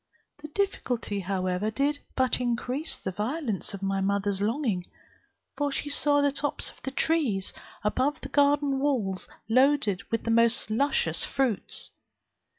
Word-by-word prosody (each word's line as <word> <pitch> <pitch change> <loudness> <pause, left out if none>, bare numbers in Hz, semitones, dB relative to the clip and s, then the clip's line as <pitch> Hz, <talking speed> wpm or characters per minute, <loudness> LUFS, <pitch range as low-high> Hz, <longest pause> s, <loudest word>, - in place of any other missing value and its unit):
The 305 - -6
difficulty, 260 - -1
however, 185 +1 -1
did 285 +5 0 0.2
but 260 -1 +2
increase 250 +5 -2
the 190 - -4
violence 215 - -2
of 195 - -9
my 195 0 0
mother's 200 0 +1
longing; 215 -5 0 0.7
for 290 -1 0
she 290 - -3
saw 290 0 +3
the 285 0 +3
tops 285 +1 -1
of - - -22
the 265 - -3
trees 265 -9 0 0.3
above 265 +8 +1
the 270 - -7
garden 285 -1 +3
walls 235 -10 0 0.2
loaded 255 -4 +3
with 230 - -1
the 230 - 0
most 230 -1 +3
luscious 280 +6 +1
fruits. 260 -7 -1
250 Hz, 145 wpm, -28 LUFS, 200-285 Hz, 0.7 s, saw